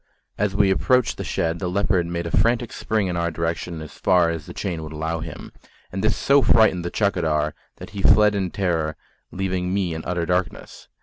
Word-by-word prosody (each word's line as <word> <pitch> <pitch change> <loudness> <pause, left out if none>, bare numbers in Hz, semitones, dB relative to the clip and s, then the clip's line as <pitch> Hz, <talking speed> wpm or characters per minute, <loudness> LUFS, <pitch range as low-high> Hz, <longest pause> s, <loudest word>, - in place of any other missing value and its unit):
As 105 -1 -1
we 100 -2 +4
approached 125 +5 +2
the - - -4
shed, 85 +1 -1
the 90 - -2
leopard 90 -2 +1
made 85 0 -3
a 85 - -1
frantic 115 +5 +1
spring 110 -2 -1
in 90 -2 -2
our 85 0 0
direction 85 0 -3
as 75 - -10
far 90 -3 +3
as 80 -2 -6
the - - -8
chain 90 -5 -3
would 80 0 -7
allow 80 +2 -2
him, - - -8 0.4
and 95 +2 -4
this 110 - +2
so 140 0 +4
frightened 110 -8 +4
the 85 - -2
chaukidar 80 -8 0 0.2
that - - -11
he 100 - -5
fled 105 +1 +5
in 95 -3 -1
terror, 85 -5 -1 0.4
leaving 90 -1 -2
me 95 -3 0
in 80 0 -5
utter 85 -2 -2
darkness. 90 0 -3
90 Hz, 205 wpm, -23 LUFS, 85-100 Hz, 0.4 s, fled